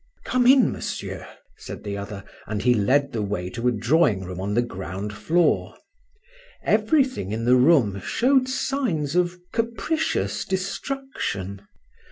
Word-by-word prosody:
"Come 250 -1 +2
in, 265 -1 +6
monsieur," - - -5 0.3
said - - -9
the 100 -1 -4
other, 100 0 -6 0.2
and 105 -1 -3
he 125 0 +5
led 130 +6 +2
the 115 - -2
way 100 -3 -3
to 120 +4 -2
a - - +4
drawing 120 - +2
room 90 0 -6
on 100 +2 -2
the 120 - +3
ground 95 -1 -6
floor. 165 +11 +1 0.9
Everything 240 - +2
in 115 +2 -2
the 125 +1 +5
room 125 - +4
showed 260 +1 +2
signs 240 - -1
of 180 0 +1 0.2
capricious 235 +8 -1
destruction. 190 - -4
125 Hz, 140 wpm, -24 LUFS, -, 0.9 s, in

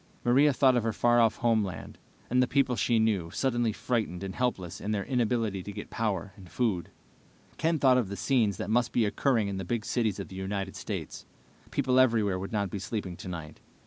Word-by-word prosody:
Maria 135 +5 +5
thought 130 -1 +4
of 120 - +3
her 115 0 0
far 120 +1 +3
off 115 -1 +3
homeland, 110 -8 -1 0.3
and 125 +1 +2
the 125 - +3
people 135 -2 +2
she 120 0 +2
knew, 105 -7 +1
suddenly 120 +2 0
frightened 110 -6 -2
and 95 -1 -4
helpless 95 -9 -2
in 105 - -4
their 105 -2 -1
inability 115 -6 0
to 100 - -7
get 105 +1 -8
power 100 -4 -2
and 95 -4 -14
food. 105 -7 -1 0.7
Ken 160 0 +1
thought 130 -3 +5
of 110 -6 -2
the 100 - -5
scenes 110 -2 +1
that - - -4
must 120 +1 +2
be 115 - +3
occurring 115 0 +1
in 100 -1 -3
the 95 - -3
big 110 +4 -2
cities 110 -5 0
of 100 - -6
the 95 - -10
United 95 0 -4
States. - - -6 0.4
People 130 0 +2
everywhere 110 -7 +3
would 95 - -6
not 100 -4 -1
be 100 - -4
sleeping 95 -2 -4
tonight. 85 -4 -7
110 Hz, 210 wpm, -29 LUFS, 95-120 Hz, 0.7 s, Maria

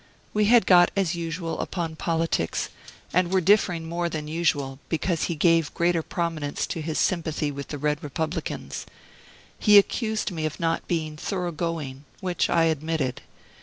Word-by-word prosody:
We 210 0 +3
had 230 -1 +6
got, 175 -2 +7
as 195 -3 +1
usual, 165 0 -3
upon 165 -3 -3
politics, 165 - -1 0.4
and 180 0 +2
were 190 - +4
differing 180 -3 +3
more 170 +1 -1
than 155 -2 -4
usual, 145 -4 0
because 165 0 0
he 170 - -2
gave 165 0 +3
greater 170 -1 +2
prominence 160 -3 -2
to 165 - -4
his 155 0 -3
sympathy 160 -4 0
with 140 0 -6
the 145 - -5
Red 150 +2 0
Republicans. 160 +3 -4 0.7
He 210 -1 +7
accused 215 +1 +2
me 160 -3 -1
of 155 - -7
not 165 0 -1
being 155 -3 -2
"thorough 180 +1 -2
going," 150 -4 -4
which 180 -2 0
I 165 -1 +4
admitted. 160 -4 -1
165 Hz, 160 wpm, -25 LUFS, 155-175 Hz, 0.7 s, got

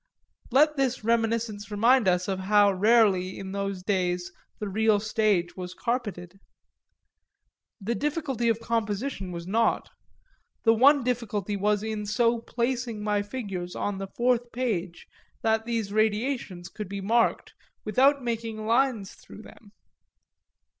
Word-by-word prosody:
Let 300 +4 +4
this 265 -3 0
reminiscence 225 -2 0
remind 230 +2 +3
us 180 0 +2
of 190 -1 -2
how 205 +1 +4
rarely 195 -2 +3
in 190 -1 -7
those 195 -2 -3
days 180 -2 -1 0.3
the 210 - -4
real 215 +1 +2
stage 210 -4 0
was 180 -1 -7
carpeted. 205 -7 -4 1.4
The 220 +3 -2
difficulty 275 -4 -1
of 225 -1 +1
composition 225 -2 -2
was 170 -1 -6
naught; 225 +5 0 0.7
the 225 - +5
one 275 +4 +5
difficulty 215 -5 -2
was 205 +1 +1
in 215 -1 -4
so 230 +2 +2
placing 235 -2 -3
my 210 -1 +1
figures 200 -5 -5
on 205 -1 -3
the 195 - -4
fourth 240 0 +1
page 195 -8 -3 0.4
that 220 0 +1
these 225 -4 -2
radiations 215 -4 -1
could 205 0 -7
be 200 0 -4
marked 230 +4 +1 0.3
without 270 +6 +3
making 225 -2 -3
lines 230 -4 +1
through 215 - -14
them. 205 -3 -16
215 Hz, 135 wpm, -26 LUFS, 195-235 Hz, 1.4 s, the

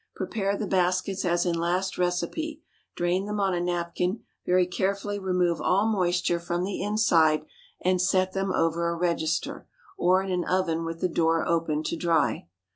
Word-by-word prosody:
Prepare 200 -2 -2
the 215 - -2
baskets 185 +1 0
as 175 0 +1
in 175 - +1
last 175 +3 -1
recipe, 180 - -1 0.4
drain 180 +3 0
them 210 0 -2
on 195 -2 +1
a 175 - 0
napkin, 175 +3 -2 0.2
very 180 0 +4
carefully 200 +3 -2
remove 180 -3 0
all 195 +3 +2
moisture 180 -4 +1
from 175 +1 -2
the 195 +1 -3
inside, 170 -7 +3 0.4
and 185 0 +2
set 185 0 +2
them 195 0 -1
over 170 0 +1
a 170 - -2
register, 165 -2 -1 0.3
or 185 +1 +3
in 195 - -4
an 180 -1 0
oven 170 -3 0
with 165 0 -5
the - - +2
door 165 -1 +1
open, 160 -2 0
to 170 - -2
dry. 160 - +1
180 Hz, 170 wpm, -26 LUFS, 170-190 Hz, 0.4 s, very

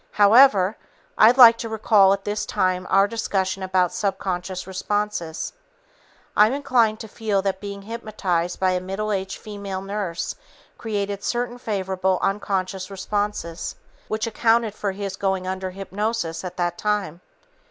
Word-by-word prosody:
However, 205 -2 +6 0.4
I'd 235 +4 +6
like 235 -3 +9
to 230 - -4
recall 215 -3 +4
at 195 0 0
this 210 0 -2
time 185 -2 0
our 195 +1 +5
discussion 195 -4 -2
about 185 -1 +1
subconscious 185 -2 -3
responses. 190 -3 -3 0.8
I'm 215 +4 +5
inclined 250 -6 +2
to 220 - -7
feel 210 -2 -1
that 190 -1 -2
being 200 -1 -7
hypnotized 195 -6 -2
by 185 -1 +2
a 180 - 0
middle 195 +3 -3
aged 195 -1 -2
female 200 -3 -6
nurse 195 -4 -3 0.4
created 200 -2 -3
certain 245 0 -2
favorable 190 -4 -1
unconscious 190 -1 -1
responses 195 -3 -3 0.3
which 215 +1 -1
accounted 230 -1 +2
for 205 -2 -2
his 195 -1 -5
going 190 -1 -1
under 190 0 -3
hypnosis 195 -2 -3
at 180 - -7
that 175 -1 -1
time. 205 -5 -1
200 Hz, 140 wpm, -23 LUFS, 185-215 Hz, 0.8 s, like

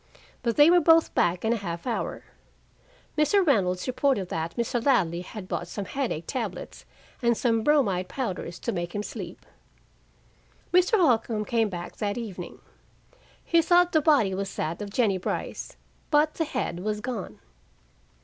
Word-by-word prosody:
But 235 -2 0
they 295 +3 +7
were 355 - +6
both 325 0 +4
back 175 +4 +1
in 225 - +3
a - - 0
half 170 -5 -5
hour. 240 -3 -3 0.9
Mr. 335 +6 +3
Reynolds 185 - +2
reported 255 -7 +1
that 165 +1 -3
Mr. 235 0 -1
Ladley 180 -11 +2
had 185 +1 -9
bought 175 - -3
some 200 +3 -5
headache 230 - -3
tablets 215 -8 -5 0.4
and 235 -2 +2
some 230 -2 +1
bromide 220 -10 +2
powders 185 -9 -4
to - - -2
make 175 +1 -4
him 205 - -2
sleep. - - -8 1.3
Mr. 365 +5 +4
Holcombe 230 - +2
came 225 -1 +1
back 175 -2 -7
that 205 0 -2
evening. 195 -7 -6 0.9
He 335 0 +4
thought 350 +2 +4
the 315 - +3
body 280 - +3
was 195 +1 -4
that 165 +5 -3
of 205 - -5
Jennie 200 -3 +1
Brice, - - -4 0.3
but 300 +1 +3
the 325 - -1
head 255 - -3
was 210 +2 -2
gone. 210 - -5
225 Hz, 160 wpm, -26 LUFS, 185-280 Hz, 1.3 s, they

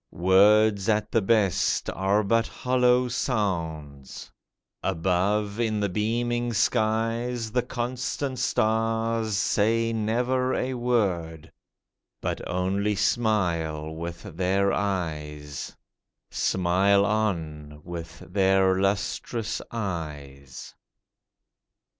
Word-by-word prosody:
Words, 100 +3 +4
at 105 -1 +1
the 115 - +2
best, 100 -4 +1
are 100 +3 +1
but 115 +3 +2
hollow 125 0 +2
sounds; 85 - -3 0.5
Above, 95 +4 0
in 110 -2 0
the 100 -1 0
beaming 120 +4 -1
skies, 115 +2 0
The 125 +2 +2
constant 125 +2 -3
stars 115 -2 0
say 115 +2 +1
never 125 +4 0
a 130 +1 -1
word, 95 -11 -1 0.7
But - - -3
only 100 +3 0
smile 85 -9 0
with 85 +1 -6
their 95 +1 0
eyes— 75 -7 -3 0.6
Smile 95 +2 +2
on 80 -9 -2
with 85 -1 -8
their 95 0 +3
lustrous 105 +3 -1
eyes. 75 - -6
100 Hz, 85 wpm, -26 LUFS, 85-115 Hz, 0.7 s, Words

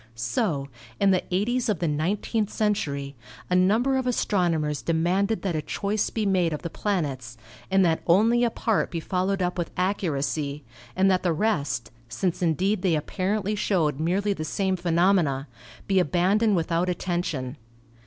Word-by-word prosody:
So, 135 - -1 0.3
in 200 -1 +4
the 185 - +2
eighties 230 +7 0
of 210 - +1
the 170 - -1
nineteenth 195 +8 -1
century, 145 -12 -1 0.4
a - - +4
number 220 +9 +3
of 260 -1 -1
astronomers 170 - 0
demanded 180 +6 0
that 185 -4 -1
a 155 - 0
choice 205 +6 -1
be 220 -2 -2
made 180 -4 +2
of 150 - -5
the 170 - -4
plan 195 -6 0
ets, 125 -4 -7 0.3
and 195 -1 +4
that 165 -1 +1
only 225 +7 +4
a 240 - +3
part 225 -1 0
be 170 - -3
followed 185 +2 -1
up 180 0 -2
with 170 - -2
accuracy, 150 -6 -1 0.3
and 190 +1 +4
that 185 - +2
the 175 -2 +1
rest 145 - -1 0.2
(since 170 +10 -2
indeed 180 +4 +1
they 180 -4 +2
apparently 190 +6 -1
showed 170 -9 0
merely 195 +6 +1
the 155 - -5
same 190 +4 0
phenomena) 170 -5 +2 0.4
be 195 -1 +2
abandoned 190 +6 +2
without 170 +1 0
at 180 - -1
tention. 155 -7 -2
180 Hz, 165 wpm, -25 LUFS, 155-200 Hz, 0.4 s, in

